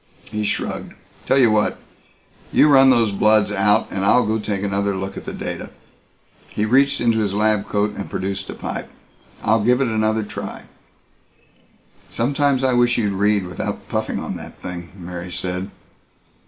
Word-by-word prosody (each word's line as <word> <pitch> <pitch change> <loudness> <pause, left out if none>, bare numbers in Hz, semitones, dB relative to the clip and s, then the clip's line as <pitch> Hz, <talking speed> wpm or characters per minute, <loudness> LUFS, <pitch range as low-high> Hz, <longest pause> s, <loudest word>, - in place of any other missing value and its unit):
He 105 -1 -2
shrugged. - - -3 0.3
"Tell 135 - +3
you 120 -5 +5
what. 105 -1 +1 0.7
You 150 - +5
run 135 -2 +7
those 115 -4 +4
bloods 105 +1 +3
out 105 +1 +3
and 95 - -2
I'll 125 +5 +4
go 110 +1 0
take 100 -2 -3
another 100 0 0
look 95 +1 -5
at - - -8
the - - -4
data." - - -5 0.8
He 105 - -1
reached 135 +5 +3
into 115 -2 +2
his 100 -2 -1
lab 105 -1 +1
coat 105 0 0
and 100 - -6
produced 95 +1 -4
a - - -5
pipe. - - -5 0.5
"I'll 110 -1 +2
give 125 +3 +3
it 135 - +2
another 110 0 +1
try." 105 - -7 1.5
"Sometimes 140 +2 +1
I 130 -1 +3
wish 120 0 +3
you'd 105 -4 0
read 100 0 +2
without 90 - -5
puffing - - -2
on - - -4
that - - -11
thing," 85 -1 -7
Mary 90 0 -7
said. 90 +1 -4
105 Hz, 170 wpm, -21 LUFS, 100-120 Hz, 1.5 s, run